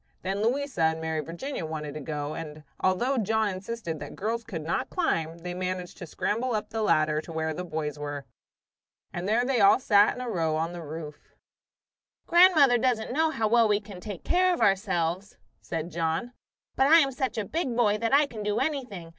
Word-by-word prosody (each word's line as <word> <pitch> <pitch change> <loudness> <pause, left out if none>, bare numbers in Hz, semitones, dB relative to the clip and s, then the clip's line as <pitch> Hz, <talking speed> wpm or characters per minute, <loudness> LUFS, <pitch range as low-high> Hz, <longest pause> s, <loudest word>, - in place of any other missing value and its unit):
Then 195 +2 -2
Louisa 265 -1 -1
and 160 0 +2
Mary 160 -1 -2
Virginia 170 - -5
wanted 155 -2 -5
to 155 - -6
go, 145 0 -4
and 155 -2 -7 0.2
although 240 +8 +1
John 220 0 +1
insisted 185 -3 -5
that - - -8
girls 230 +3 -2
could 185 -9 -6
not 165 - -2
climb, 165 - -1
they 175 +1 -6
managed 180 0 -4
to 175 - -7
scramble 230 +8 -1
up 215 0 -4
the 225 -1 -2
ladder 155 -6 +2
to 165 - -11
where 160 0 -2
the 180 - -5
boys 155 -3 -4
were. 145 -1 -5 0.9
And 175 +3 -3
there 235 +3 +2
they 260 -2 +1
all 200 +4 +6
sat 205 -4 +4
in 250 - -6
a 250 - -4
row 165 -8 0
on 165 +2 -2
the 175 - -7
roof. 150 -1 -9 0.9
"Grandmother 335 -8 +6
doesn't 245 -2 0
know 320 +3 +2
how 225 -8 0
well 230 +1 +4
we 205 -1 +2
can 205 -3 -11
take 205 -4 -7
care 365 +1 +3
of - - -8
ourselves," 190 -1 0 0.2
said 165 +1 -4
John. 165 +8 -2 0.4
"But 265 - +3
I 320 +3 +8
am 275 -5 +4
such 260 -1 -3
a 215 - -1
big 270 - -2
boy 215 -3 +3
that 230 0 -1
I 285 +2 +5
can 230 -6 -8
do 210 0 -1
anything. 255 - -3
200 Hz, 205 wpm, -27 LUFS, 165-240 Hz, 0.9 s, I